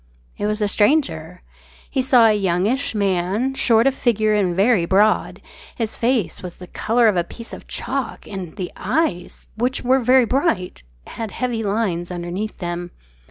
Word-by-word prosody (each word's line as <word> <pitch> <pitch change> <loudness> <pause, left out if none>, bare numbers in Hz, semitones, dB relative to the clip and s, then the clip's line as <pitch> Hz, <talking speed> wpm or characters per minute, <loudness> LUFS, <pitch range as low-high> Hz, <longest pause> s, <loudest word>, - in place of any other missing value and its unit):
It 205 - -2
was 210 0 -1
a - - +2
stranger. 195 - 0 0.4
He 265 - -1
saw 255 -2 +5
a 220 - +5
youngish 205 +6 +1
man 200 +5 0
short 230 -4 +4
of 270 - +3
figure 220 -4 +1
and 190 -4 +1
very 200 0 +3
broad. 205 +4 +2 0.3
His 225 -2 -3
face 230 -8 0
was 180 -2 -8
the 180 - -11
colour 230 +5 +1
of 205 -4 +2
a 175 - +2
piece 230 +6 -11
of - - -10
chalk 265 -2 -4
and 190 -5 -7
the 180 -2 -5
eyes, 180 - -2
which 250 +4 -1
were 260 +2 +3
very 255 +1 +4
bright, 255 - -1 0.2
had 225 -1 -6
heavy 240 0 -3
lines 200 -5 -1
underneath 180 +4 -5
them. 175 -1 -4
215 Hz, 165 wpm, -21 LUFS, 180-245 Hz, 0.4 s, saw